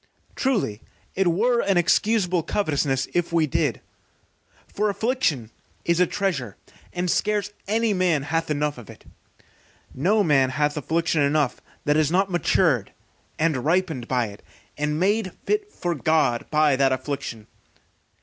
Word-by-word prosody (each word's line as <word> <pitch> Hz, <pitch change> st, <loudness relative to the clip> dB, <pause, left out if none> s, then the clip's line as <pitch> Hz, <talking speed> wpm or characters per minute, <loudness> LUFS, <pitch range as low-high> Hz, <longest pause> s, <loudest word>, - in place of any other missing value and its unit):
Truly 205 Hz, -, -1 dB, 0.3 s
it 195 Hz, -1 st, +1 dB
were 235 Hz, +8 st, +2 dB
an 195 Hz, -2 st, +1 dB
excusable 180 Hz, 0 st, +2 dB
covetousness 145 Hz, -7 st, 0 dB
if 175 Hz, -1 st, 0 dB
we 165 Hz, -2 st, +3 dB
did, 145 Hz, -, -1 dB, 0.9 s
for 210 Hz, +1 st, -1 dB
affliction 200 Hz, -, -1 dB, 0.3 s
is 170 Hz, 0 st, +2 dB
a 180 Hz, -, +4 dB
treasure, 160 Hz, -, -2 dB, 0.3 s
and 180 Hz, 0 st, -2 dB
scarce 210 Hz, +3 st, 0 dB, 0.2 s
any 220 Hz, +1 st, +1 dB
man 180 Hz, -6 st, +1 dB
hath 165 Hz, +2 st, -1 dB
enough 150 Hz, -2 st, -1 dB
of 115 Hz, -, -13 dB
it. -, -, -14 dB, 0.9 s
No 200 Hz, +10 st, +2 dB
man 135 Hz, -6 st, +3 dB
hath 150 Hz, +3 st, 0 dB
affliction 160 Hz, +2 st, 0 dB
enough 145 Hz, -1 st, +1 dB, 0.2 s
that 150 Hz, +1 st, +3 dB
is 155 Hz, -2 st, +3 dB
not 190 Hz, +3 st, +1 dB
matured 160 Hz, -, +2 dB, 0.5 s
and 155 Hz, -6 st, 0 dB
ripened 160 Hz, -6 st, 0 dB
by 125 Hz, -2 st, +1 dB
it, 100 Hz, -, -13 dB, 0.3 s
and 150 Hz, +1 st, -1 dB
made 200 Hz, +1 st, +1 dB
fit 420 Hz, 0 st, -1 dB
for 175 Hz, -, -2 dB
God 155 Hz, -6 st, +1 dB
by 150 Hz, -2 st, +3 dB
that 135 Hz, 0 st, +3 dB
affliction. 130 Hz, -4 st, -4 dB
165 Hz, 140 wpm, -24 LUFS, 140-195 Hz, 0.9 s, a